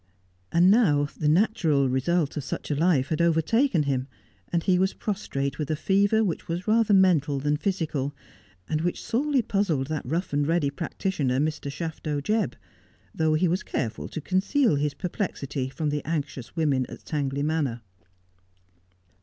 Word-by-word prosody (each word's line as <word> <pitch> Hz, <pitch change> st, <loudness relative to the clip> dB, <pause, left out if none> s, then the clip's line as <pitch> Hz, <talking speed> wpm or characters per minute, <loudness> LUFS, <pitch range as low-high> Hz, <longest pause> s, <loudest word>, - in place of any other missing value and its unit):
And 175 Hz, +3 st, +5 dB
now 150 Hz, -11 st, +4 dB
the 150 Hz, -, -1 dB
natural 160 Hz, -, +3 dB
result 145 Hz, +5 st, 0 dB
of 150 Hz, -, -3 dB
such 135 Hz, -, -5 dB
a -, -, +1 dB
life 145 Hz, -4 st, +2 dB
had 160 Hz, +1 st, 0 dB
overtaken 170 Hz, -, +2 dB
him, 135 Hz, -2 st, -1 dB, 0.4 s
and 170 Hz, -1 st, +1 dB
he 180 Hz, -2 st, +3 dB
was 190 Hz, +1 st, +1 dB
prostrate 140 Hz, -10 st, -3 dB
with 150 Hz, -, -3 dB
a 155 Hz, -, +1 dB
fever 200 Hz, +6 st, +2 dB
which 180 Hz, -6 st, -2 dB
was 170 Hz, +4 st, -4 dB
rather 220 Hz, 0 st, +3 dB
mental 170 Hz, -8 st, +4 dB
than 145 Hz, +2 st, +1 dB
physical, 150 Hz, -6 st, -2 dB, 0.5 s
and 155 Hz, 0 st, -1 dB
which 175 Hz, +1 st, -2 dB
sorely 270 Hz, +2 st, +1 dB
puzzled 195 Hz, -11 st, 0 dB
that 155 Hz, -2 st, -2 dB
rough 165 Hz, +5 st, -3 dB
and 145 Hz, 0 st, +1 dB
ready 165 Hz, -4 st, +1 dB
prac 155 Hz, +4 st, -6 dB
titioner, 145 Hz, -10 st, 0 dB
Mr. 150 Hz, -1 st, -1 dB
Shafto 155 Hz, -1 st, -3 dB
Jebb, 215 Hz, +10 st, 0 dB, 0.6 s
though 160 Hz, -1 st, +2 dB
he 175 Hz, +4 st, +2 dB
was 180 Hz, +4 st, 0 dB
careful 115 Hz, -1 st, -3 dB
to 160 Hz, -, -6 dB
conceal 195 Hz, -, +2 dB
his 145 Hz, 0 st, -1 dB
perplexity 145 Hz, -8 st, -3 dB
from 150 Hz, +2 st, -2 dB
the 145 Hz, -1 st, -2 dB
anxious 145 Hz, -5 st, -4 dB
women 140 Hz, -6 st, +1 dB
at -, -, -11 dB
Tangley 140 Hz, -2 st, -2 dB
Manor. 145 Hz, -6 st, -1 dB
160 Hz, 165 wpm, -26 LUFS, 145-185 Hz, 0.6 s, And